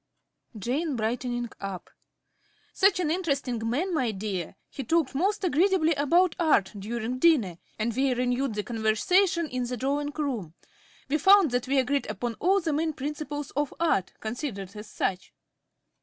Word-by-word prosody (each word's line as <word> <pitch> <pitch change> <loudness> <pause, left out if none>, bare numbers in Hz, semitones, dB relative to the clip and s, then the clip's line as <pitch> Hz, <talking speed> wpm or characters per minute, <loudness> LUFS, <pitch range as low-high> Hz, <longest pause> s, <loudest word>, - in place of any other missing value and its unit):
~Jane~ 270 - -1
(brightening 240 +1 -2
up). 195 -3 -6 0.8
Such 385 -1 +4
an 325 -4 +1
interesting 280 -9 -1
man, 340 +10 -1
my 260 -7 +1
dear. 195 -4 -4
He 275 - -6
talked 325 +2 +1
most 390 +9 0
agreeably 345 0 +3
about 335 +5 +3
Art 260 - +3
during 235 +4 -3
dinner, 240 - +3 0.2
and 225 +1 -1
we 265 +1 +2
renewed 250 0 0
the 210 - -1
conversation 325 - +2
in 250 -3 -3
the 250 0 -3
drawing 285 +4 -1
room. 235 - -3 0.5
We 305 +3 +1
found 385 -2 +6
that 245 0 -1
we 275 +1 +1
agreed 275 +2 +1
upon 220 +3 -3
all 385 +4 +3
the 330 -4 -1
main 315 +1 0
principles 290 0 -5
of 290 -1 -2
Art, 315 - +1
considered 220 -4 -5
as 210 +1 -8
such. 185 -1 -3
270 Hz, 155 wpm, -27 LUFS, 225-315 Hz, 0.8 s, found